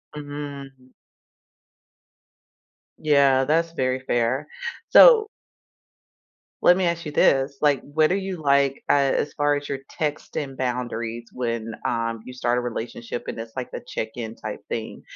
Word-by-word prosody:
Mhm. 140 -3 -8 2.1
Yeah, 140 -3 +4
that's 165 +3 +1
very 130 -4 0
fair. 130 +2 0 0.4
So 455 -4 +8 1.4
let 180 - +7
me 190 - +1
ask 170 -1 -1
you - - -4
this. 135 -1 +3
Like, 145 -3 +3
what 155 +2 +1
are - - +3
you 190 -1 -4
like, 140 -3 +2
uh, - - +4
as 140 0 +1
far 145 0 +2
as 145 0 -4
your 140 -1 -3 0.2
texting 145 -2 -3
boundaries 120 -2 -3
when, 115 -2 -3
um, 115 -1 -1
you 125 - -9
start 125 -1 0
a - - -2
relationship 120 0 -5
and - - -5
it's 115 0 -8
like 130 -1 -5
the - - -6
check 110 -3 -3
in 115 -2 -6
type - - -6
thing? - - -5
135 Hz, 145 wpm, -24 LUFS, 120-150 Hz, 2.1 s, So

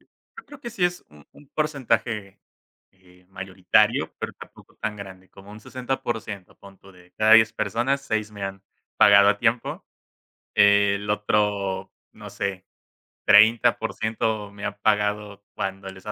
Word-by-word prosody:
Yo - - -18
creo 290 -1 -14
que 240 -3 -7
sí 200 -6 -1
es 175 0 -1
un 75 -1 -18
un 145 - -19
porcentaje, 125 -9 -2 0.5
eh, 90 -1 -24
mayoritario, 95 -1 +1
pero - - -5
tampoco - - -16
tan 110 -1 -4
grande, 95 -2 -11
como 100 +1 -15
un 105 +1 -11
60%, 120 -5 -5
pon 100 -1 -16
tu 95 - -17
de 90 -1 -20
cada 110 0 +4
10 110 -1 +7
personas, 120 +6 -1
6 110 -5 -2
me 100 -1 -9
han 95 0 -6 0.3
pagado 100 0 +7
a 100 - +2
tiempo. 120 +1 -1 0.7
El 100 0 +4
otro, 105 -2 0 0.2
no - - -11
sé, 95 -1 -4 0.6
30% 110 0 +3
me 100 0 -8
ha 105 - -4
pagado 105 -1 -1
cuando 95 0 -4
les 95 0 -13
ha 105 - -4
105 Hz, 150 wpm, -24 LUFS, 95-110 Hz, 0.7 s, 10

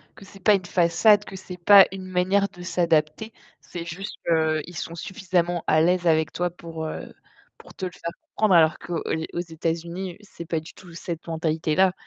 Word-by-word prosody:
que 195 - -14
c'est 195 0 -15
pas 210 - +6
une 185 - -3
façade, 185 +4 +4
que 195 - -9
c'est 185 -1 -9
pas 195 +2 +8
une 190 -1 -7
manière 185 +2 +1
de 180 - -14
s'adapter. 170 +3 0 0.3
C'est 170 -1 -7
juste 180 +5 -6
qu'ils 160 0 0
sont 170 - -5
suffisamment 175 -2 -1
à 155 - +4
l'aise 175 +1 +2
avec 160 -1 +2
toi 175 0 -1
pour, 165 -2 -7
heu, 155 - -6 0.4
pour - - -15
te 190 - -5
le 180 - -4
faire 170 -1 -6 0.2
comprendre, 170 -7 +4
qu'aux 170 -2 -4 0.3
aux - - -2
États-Unis, 170 +2 -4
c'est 195 -4 -10
pas 165 0 -1
du 160 - -13
tout 180 -3 -14
cette 170 -1 -6
mentalité 160 -1 -1
là. 190 +1 +4
175 Hz, 190 wpm, -24 LUFS, 165-190 Hz, 0.4 s, pas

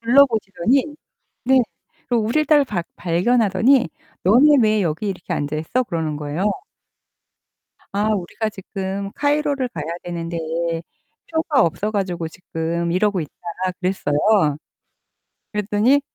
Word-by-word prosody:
둘러보시더니 245 - +3 0.5
네. 265 +1 +5 0.5
그 245 - +1
우릴 235 +7 +1
딸 295 0 +5
박 190 -10 -3
발견하더니 225 +7 +3 0.3
"너네 265 +10 +6
왜 215 -2 +3
여기 165 +5 -2
이렇게 180 -2 -4
앉아 145 +1 -2
있어?" 160 +12 0
그러는 165 -8 -2
거예요. 150 +4 -3 1.5
"아 205 +2 +1
우리가 205 +3 -3
지금 195 0 -5
카이로를 285 -2 +1
가야 160 -10 -6 0.2
되는데 170 -1 -4 0.9
표가 320 -4 +2
없어 185 +6 0
가지고 185 -5 -2
지금 170 0 -3
이러고 195 0 +2
있다." 150 - -6 0.5
그랬어요. 180 -6 0 1.4
그랬더니 210 +6 +2
205 Hz, 270 characters per minute, -21 LUFS, 170-250 Hz, 1.5 s, 너네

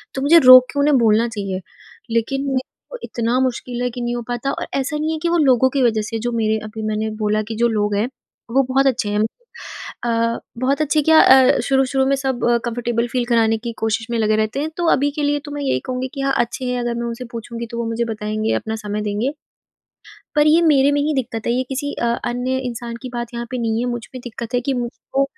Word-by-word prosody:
तो 265 - -2
मुझे 315 +5 +6
रोक 255 0 +10
के 285 - -1
उन्हें 285 -1 +4
बोलना 225 -1 +3
चाहिए। 195 -4 -4 0.5
लेकिन 270 +5 0
मेरे 260 -1 +1 0.3
वो - - -6
इतना 235 +1 -1
मुश्किल 250 -1 -2
है 250 - 0
कि 245 +1 -6
नहीं 240 0 -2
हो 240 - -3
पाता 245 +3 -2
और - - -4
ऐसा 275 +3 -2
नहीं 310 +1 -1
है 320 - -2
कि 340 - +1
वो 345 - +2
लोगों 260 -4 +4
की 275 - +1
वजह 220 -3 +2
से 225 +2 -4
जो 240 +2 -2
मेरे 220 -1 +1
अभी 215 +1 -7
मैंने 215 0 -1
बोला 215 0 +1
कि 225 - -3
जो 235 +2 +2
लोग 210 -2 0
हैं, 210 +4 +1 0.4
वो 270 +3 +4
बहुत 270 +1 +3
अच्छे 245 -5 0
हैं 205 0 0 0.8
अ, 230 -1 0 0.2
बहुत 270 +5 0
अच्छे 305 +1 +2
क्या 320 +1 +6
अ, 260 -1 +6
शुरू-शुरू 265 +1 +1
में 275 - +3
सब 265 -2 -2 0.3
कम्फर्टेबल 235 0 -1
फ़ील 250 -2 0
कराने 225 -2 +2
की 235 +1 -6
कोशिश 225 0 -1
में 235 - 0
लगे 215 -1 +2
रहते 215 +4 -1
हैं, 305 +2 -2
तो 345 -1 0
अभी 285 +2 +1
के 295 +1 -4
लिए 290 0 +1
तो 290 - -8
मैं 290 0 -4
यही 195 - +1
कहूँगी 255 0 -3
कि 275 - -3
हाँ 275 0 +1
अच्छे 240 +2 -1
हैं, 250 0 -1
अगर 240 0 -2
मैं 235 0 -3
उनसे 235 +2 -5
पूछूँगी 235 0 -6
तो 235 - -5
वो 235 - -2
मुझे 230 +1 -1
बताएँगे, 215 +1 -2
अपना 220 0 -3
समय 210 +1 -2
देंगे। 210 +6 -1 1.0
पर 295 0 +5
ये 315 +2 +5
मेरे 285 -4 +4
में 290 - +1
ही 300 +2 0
दिक्कत 235 -4 -3
है 235 - +2
ये 250 +2 +1
किसी 280 +2 -3
अ, - - -3 0.2
अन्य 250 +2 -1
इंसान 235 -1 -6
की 255 - -5
बात 240 0 -5
यहाँ 235 0 -4
पे 255 - -3
नहीं 225 -1 0
है, 245 - -1
मुझ 240 -1 -4
में 255 - -6
दिक्कत 235 0 -7
है 245 - +3
कि 270 +2 -1
मुझको 250 +2 -2
240 Hz, 245 wpm, -20 LUFS, 225-270 Hz, 1.0 s, रोक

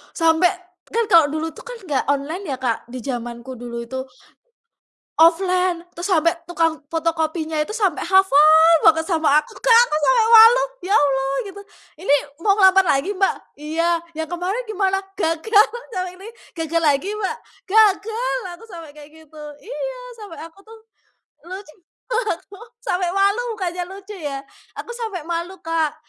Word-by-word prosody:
sampai 325 +1 +3 0.4
kan 465 0 +1
kalau 335 -3 +7
dulu 315 +1 -3
tuh - - -12
kan - - -7
nggak 280 -3 0
online 290 +7 -3
ya - - -1
Kak 240 -3 -2
di 255 +1 -8
zamanku 240 0 -6
dulu 235 -1 -6
itu. 260 +3 -6 1.1
Offline, 360 +1 +2
terus 350 +4 -5
sampai 335 -2 +3 0.2
tukang 330 -2 0
fotokopinya 320 -1 -2
itu 300 - -4
sampai 410 -8 -1
hafal 325 -3 +5
banget 320 0 +4
sama 325 -4 0
aku 305 - -2
Kak, 475 -2 +5
aku 305 - -3
sampai 465 +6 +3
malu 455 +3 +8 0.3
"Ya - - +2
Allah!" 270 -1 +1
Gitu. 400 +1 -10 0.4
"Ini 290 -6 +3 0.3
mau 395 +2 +2
ngelamar 385 -1 +6 0.2
lagi 365 +10 -3
Mbak?" 385 0 +1 0.3
"Iya," 330 +2 0 0.2
"yang 320 - -2
kemarin 360 +9 -4
gimana?" 390 -3 0 0.2
"Gagal!" 405 +4 +2 0.3
"Yang 370 -1 -3
ini 390 +3 -11 0.3
Gagal 330 +1 -1
lagi 305 +6 +1
Mbak?" 425 -2 -3 0.3
"Gagal!" 440 +4 +2 0.2
Aku 455 - -15
sampai 335 -7 -11
kayak 295 +1 -15
gitu. 315 -1 -14 0.2
Iya! - - -6 0.2
Sampai 410 -7 -10
aku 330 +5 -13
tuh 450 0 -14 0.7
lucu, 375 -2 -9 0.4
aku 425 -4 -3 0.2
sampai 360 -4 -1
malu 400 +4 +2
bukannya 360 -3 -4
lucu 390 +2 -10
ya. 280 -4 -5 0.3
Aku - - -8
sampai 445 -7 -5
malu 340 +3 -4
Kak 325 -2 -1
345 Hz, 155 wpm, -20 LUFS, 315-400 Hz, 1.1 s, malu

